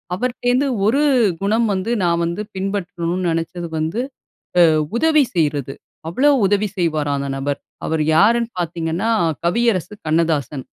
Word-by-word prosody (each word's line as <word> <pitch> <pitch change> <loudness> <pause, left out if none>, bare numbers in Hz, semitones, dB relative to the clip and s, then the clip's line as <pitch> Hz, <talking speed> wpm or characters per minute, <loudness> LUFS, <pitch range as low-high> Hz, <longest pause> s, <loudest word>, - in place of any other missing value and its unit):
அவர்ட்ட 250 +5 -3
இருந்து 265 +3 +2 0.2
ஒரு 255 +7 +3 0.4
குணம் 220 +3 +2
வந்து 190 +4 -2
நான் 170 -1 +1
வந்து 170 +4 -3
பின்பற்றணும்னு 180 -2 -2
நினைச்சது 165 +1 -3
வந்து 160 +9 -1 0.7
அ - - +2 0.2
உதவி 310 +2 +4
செய்யிறது 145 -5 0 0.3
அவ்வளவு 285 - +3
உதவி 205 +1 +1
செய்வாராம் 155 -5 0
அந்த 140 - -3
நபர். 140 +1 -2 0.3
அவரு 160 -1 0
யாருன்னு 230 +5 +3
பார்த்தீங்கன்னா 170 +4 -2 0.4
கவியரசு 210 -1 +1
கண்ணதாசன். 155 -4 0
175 Hz, 130 wpm, -19 LUFS, 160-220 Hz, 0.7 s, உதவி